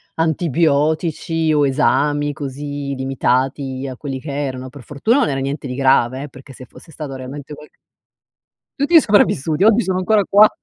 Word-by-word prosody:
antibiotici 160 0 0
o 145 -2 +3
esami, 145 +2 +1
così 140 0 -5
limitati 130 0 -1
a 130 - -8
quelli 135 -2 -6
che 145 0 -6
erano. 130 -2 -4
Per 140 0 -13
fortuna 145 - 0
non 255 - +2
era 135 -1 -2
niente 140 +1 -4
di 125 - -5
grave 130 -1 +2
eh, 145 - -8
perché 135 0 -14
se 130 - -12
fosse 160 - -17
stato 150 -4 -7
realmente 135 +3 -8
qualche 150 - -14 1.1
Tutti 325 +4 +6
sopravvissuti, 165 - +2
oggi 225 +2 +5
sono 185 -3 -1
ancora 205 +2 +2
qua. 210 +2 +6
145 Hz, 165 wpm, -19 LUFS, 135-160 Hz, 1.1 s, Tutti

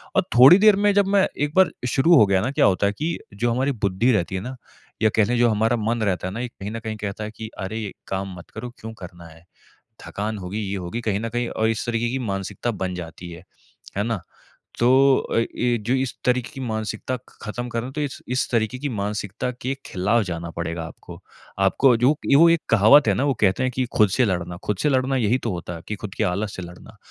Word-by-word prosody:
और - - +4
थोड़ी 135 +9 +10
देर 215 -1 +6
में 205 +1 +2
जब 200 -1 +3
मैं 195 - +4
एक 145 +1 -1
बार 185 -4 +5 0.2
शुरू 140 +8 +4
हो 110 - +7
गया 95 -1 +2
ना, 125 +6 -1
क्या 140 - +3
होता 100 0 +2
है 100 - -1
कि 160 +8 -2 0.2
जो 120 +4 0
हमारी 130 +4 +1
बुद्धि 105 +2 +1
रहती 95 -3 0
है 95 - -2
ना, 130 +5 -6 0.5
या 110 - +5
कह 110 - +4
लें 120 +3 0
जो 120 -1 +4
हमारा 110 +2 +2
मन 115 +1 -1
रहता 95 -3 -1
है 95 - -5
ना, 110 - -5
ये 125 - -2
कहीं 100 -2 -8
न 115 - -4
कहीं 110 -1 -5
कहता 105 0 -5
है 105 - -5
कि 110 -1 -7
अरे, 95 +4 -4
ये 105 -3 -5 0.2
काम 95 0 -3
मत 85 - -12
करो, 125 - -7
क्यों 110 0 -8
करना 85 -1 -10
है? 80 +1 -17 0.6
थकान 105 +1 -4
होगी, 95 +3 -5
ये 100 -1 -3
होगी 95 +5 -4
कहीं 105 -3 -1
न 115 - -3
कहीं 120 +1 -2
अ, 110 - -2
इस 110 0 -1
तरीक़े 120 0 0
की 135 - -2
मानसिकता 100 +1 -3
बन 95 -4 -3
जाती 85 0 -8
है। 85 - -10 0.5
है 100 - +1
ना? 115 -5 -2 0.6
तो 120 - +4 0.3
अ, - - -3
ये 120 +1 0
जो 115 +4 -2
इस 130 -2 -1
तरीक़े 125 -1 +1
की 135 - -8
मानसिकता 110 +2 -3 0.2
खत्म 120 +3 -5
कर 115 - -2
रहे 120 - -4
है, - - -8
तो 150 - -3
इस, 145 -2 -4
इस 125 +1 0
तरीक़े 115 +2 0
की 145 +1 -3
मानसिकता 105 +1 -3
के 130 +2 -1
ख़िलाफ़ 105 +5 +1
जाना 85 -2 -5
पड़ेगा 85 -1 -3
आपको। 80 - -11 0.4
आपको 120 +6 +4
जो 125 +3 +4 0.3
वो 170 +2 +7
एक 165 -1 +3
कहावत 115 +5 +6
है - - +3
ना, 130 - 0
वो 140 - +2
कहते 100 +4 +3
हैं 130 - 0
कि 130 -1 0
खुद 105 -2 +5
से 125 - +4
लड़ना 90 -3 -2
खुद 105 - -1
से 150 - +3
लड़ना 130 0 +1
यही 120 +1 +2
तो - - 0
होता 85 -1 -5
है 85 - -9
कि 105 - -2
खुद 100 -2 -5
के - - 0
आलस 100 +3 -2
से - - -5
लड़ना, 90 +5 -12
110 Hz, 250 wpm, -23 LUFS, 95-125 Hz, 0.6 s, थोड़ी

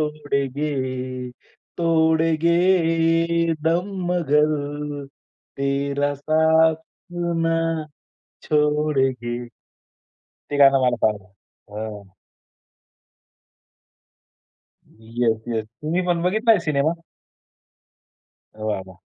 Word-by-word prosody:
छोड़ेंगे, 130 -3 -3 0.5
तोड़ेंगे 165 0 +2
दम 170 +5 +1 0.2
मगर 150 -3 0 0.5
तेरा 140 +1 0
साथ 160 +2 +3 0.7
ना 165 0 +2 0.9
छोड़ेंगे. 145 -5 +1 0.9
ते 145 - -8
गाणं 135 -1 +6
मला 125 -1 +2
फार 105 -2 -3 0.6
हां. 105 -3 -8 2.7
Yes, 115 0 -2
yes. 110 -2 -2
तुम्ही 155 +10 -3
पण 170 -1 +1
बघितलाय 215 +3 +3
सिनेमा? 150 +2 +1 1.6
वाह! 110 -2 -2
वाह! 90 -2 -15
150 Hz, 65 wpm, -22 LUFS, 130-165 Hz, 2.7 s, गाणं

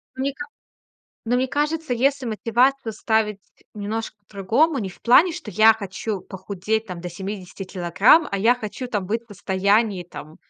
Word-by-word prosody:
Мне 270 +1 -2
ка 290 +2 -7 0.8
но 245 +2 +2
мне 255 +1 0
кажется, 295 -1 -1
если 270 +2 +1
мотивацию 235 +3 +1
ставить 215 -1 0 0.3
немножко 215 +2 -4
по-другому, 230 - +1
не 195 -4 -3
в - - -17
плане, 310 +9 +5
что 320 -11 -7
я 220 +1 +6
хочу 200 -1 -5
похудеть 200 +4 -3
там 180 -3 -7
до 180 - -5
70 190 +1 -7
килограмм, 190 - +3
а 200 - -1
я 225 +5 +4
хочу 245 +1 -6
там 205 -5 -2
быть 225 +4 -1
в - - -39
состоянии, 200 0 +1
там, 155 -1 -11
220 Hz, 165 wpm, -22 LUFS, 195-250 Hz, 0.8 s, я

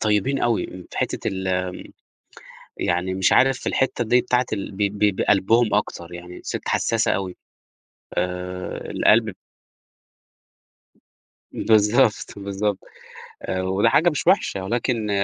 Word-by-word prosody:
طيبين 110 +6 +1
أوي 115 -6 +1
في 90 0 -10
حتّة - - -1
ال 95 0 -4 1.3
يعني 90 +2 -1
مش 95 0 +2
عارف 135 0 +4
في - - -12
الحتّة 130 -2 0
دي 125 +2 +4
بتاعة 125 0 +1
ال 100 -1 -3
ب 100 0 0
بقلبهم 110 +3 +3
أكتر، 85 -4 -2
يعني 90 +1 -9
الست - - -5
حساسة 115 -1 +1
أوي، 95 -2 -3 0.8
آآ، 90 +1 -4
القلب 110 0 +3 2.2
بالضبط، 110 +2 +2
بالضبط. 100 0 -2 0.6
آآ، 95 0 -2
وده 95 +4 +2
حاجة 160 +9 +4
مش 150 - -4
وحشة، 100 - +2
ولكن 115 0 -1
105 Hz, 120 wpm, -22 LUFS, 95-115 Hz, 2.2 s, عارف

